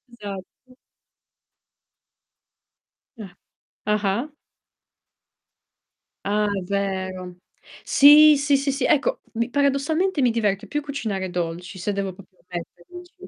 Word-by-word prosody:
Esatto. 205 +4 -10 2.4
Ah. 190 -5 -10 0.5
Ah-ah. 210 +5 0 2.0
Ah, 210 +1 +1 0.2
vero. 185 -2 -3 0.5
Sì, 295 +1 +7
sì, 285 0 +2
sì, 275 +1 0
sì. 270 -1 -1
Ecco, 285 - +2
mi 235 +1 -2
paradossalmente 285 +5 +1
mi 245 -3 +3
diverte 205 -4 -1
più 295 - -2
cucinare 220 -10 -4
dolci, 175 +2 -4
se 195 +3 -2
devo 195 -2 -3
proprio 185 -1 -18
mettermici. 180 - -9
210 Hz, 95 wpm, -23 LUFS, 190-280 Hz, 2.4 s, Sì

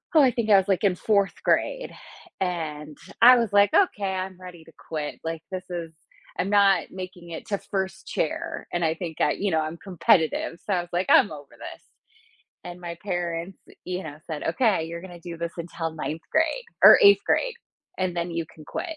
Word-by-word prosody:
Oh, 310 - +8
I 260 -3 +5
think 230 -2 -2
I 205 - +8
was 195 0 +2
like 195 0 +1
in 190 -3 +3
4th 200 0 +1
grade. - - 0 0.5
And 155 -5 -4 0.2
I 250 +1 +9
was 230 -4 0
like, 205 0 +6
"Okay, 350 - +3
I'm 185 0 -5
ready 180 -3 -11
to - - -16 0.2
quit. 150 -2 -4
Like 165 -1 -4
this 185 -1 -4
is 170 -2 -5 0.5
I'm 185 - -1
not 200 -2 +4
making 185 -2 -9
it 165 - -8
to 200 - -1
1st 190 -1 -4
chair." 155 - -3
And 175 - 0
I 160 -1 +2
think 165 -2 -6
I, 150 - +3
you 200 -2 -1
know, 160 - +2
I'm 155 +2 -4
competitive. 170 -2 +1
So 200 - 0
I 175 - +1
was 175 - -11
like, 180 +2 0
"I'm 200 - +6
over 145 -2 -9
this." - - -10 0.8
And 175 0 -8
my 170 -1 -6
parents, 175 -1 -3 0.3
you 180 +1 -4
know, 150 -3 -8
said, 155 -3 -5
"Okay, 190 -1 +1
you're 170 +1 -6
gonna 175 -1 -11
do 170 0 -8
this 170 0 -4
until 165 -1 -5
9th 160 +1 -5
grade 325 +11 +1 0.2
or - - +11
8th 405 -1 +7
grade, - - +1 0.4
and 185 -2 -2
then 170 0 -2
you 165 -1 -2
can 155 - -14
quit." 325 - -5
180 Hz, 205 wpm, -25 LUFS, 165-200 Hz, 0.8 s, or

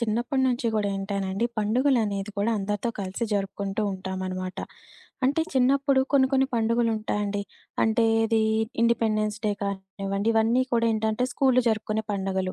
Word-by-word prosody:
చిన్నప్పడి 240 +4 0
నుంచి 245 -1 -1
గూడా 210 -2 +1
ఏంటనండి 195 +2 -2
పండుగలనేది 215 -3 +1
కూడా 205 +3 +1
అందరితో 205 +3 -2
కలిసి 195 +3 -3
జరుపుకుంటూ 200 +1 -2
ఉంటామనమాట. 185 -1 -5 0.7
అంటే 280 +5 +2
చిన్నప్పుడు 270 +1 +3
కొన్ని 270 -2 +5
కొన్ని 265 0 +3
పండుగలుంటాయండి. 220 -3 0 0.4
అంటే 225 +1 +3 0.2
ఏది 225 0 +2 0.4
ఇండిపెండెన్స్ 215 -2 +1
డే 210 - +2
కానివ్వండి, 195 +1 -3
ఇవన్నీ 225 +3 +3
కూడా 230 -1 +3
ఏంటంటే 220 +2 0
స్కూలులో 255 -2 +3
జరుపుకునే 215 0 -1
పండగలు. 190 -1 -2
215 Hz, 125 wpm, -26 LUFS, 195-235 Hz, 0.7 s, కొన్ని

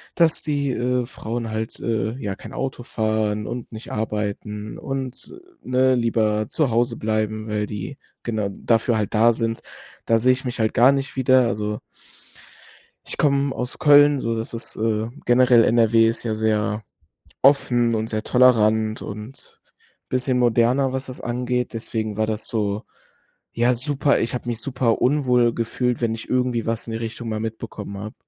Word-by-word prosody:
Dass 165 -2 +3
die, 145 -3 -1
äh, 125 0 0
Frauen 115 -1 -5
halt, 110 0 -4
äh, 110 -1 -1
ja, 105 -7 -4
kein - - -11
Auto 130 -2 -4
fahren 110 -2 -1
und 120 0 -6
nicht 110 0 -9
arbeiten 105 0 -4
und, 135 -2 -5 0.3
äh, - - -15
ne, 130 0 +3
lieber 110 -3 +1
zu 150 -5 +1
Hause 120 +1 +1
bleiben, 110 0 -2
weil 105 -1 -1
die 105 +7 -6 0.3
genau 110 -4 -2
dafür 115 +3 +1
halt 105 -2 -2
da 115 +2 +5
sind. 115 0 -2 0.4
Da 115 - +3
sehe 130 +3 +4
ich 130 +1 -5
mich 125 -1 -4
halt 110 -1 +1
gar 125 +4 +6
nicht 140 0 -2
wieder. 130 -1 +4
Also 105 -2 -2 1.2
ich - - -7
komme 140 -1 +2
aus 125 0 -5
Köln 145 -1 +6
so, 115 -2 -1
das 110 +1 -4
ist, 115 - -5
äh 110 0 0 0.2
generell 120 -1 +5
NRW 115 0 +4
ist 115 +1 -2
ja 110 -2 -1
sehr 110 -1 0 0.6
offen 120 -4 +4
und 110 0 -2
sehr 110 -1 -2
tolerant 110 -3 +3
und 110 +6 -9 0.5
bisschen 130 0 0
moderner, 125 +3 +2
was 130 0 -3
das 130 - -8
angeht, 125 0 -2
deswegen 110 -2 -4
war 110 0 +1
das 110 -1 -2
so, 105 -2 -1 0.7
ja, 120 +2 +2
super 140 +3 +1
ich 115 - -1
habe 125 -1 -4
mich 115 -2 -3
super 130 -3 0
unwohl 125 -3 +3
gefühlt, 120 +1 -1
wenn 115 -1 +1
ich 115 - -10
irgendwie 125 -3 0
was 115 0 -2
in - - -5
die 110 - -2
Richtung 115 +1 -6
mal 110 -1 -2
mitbekommen 110 -2 -6
habe. 105 +2 -7
115 Hz, 170 wpm, -22 LUFS, 110-125 Hz, 1.2 s, gar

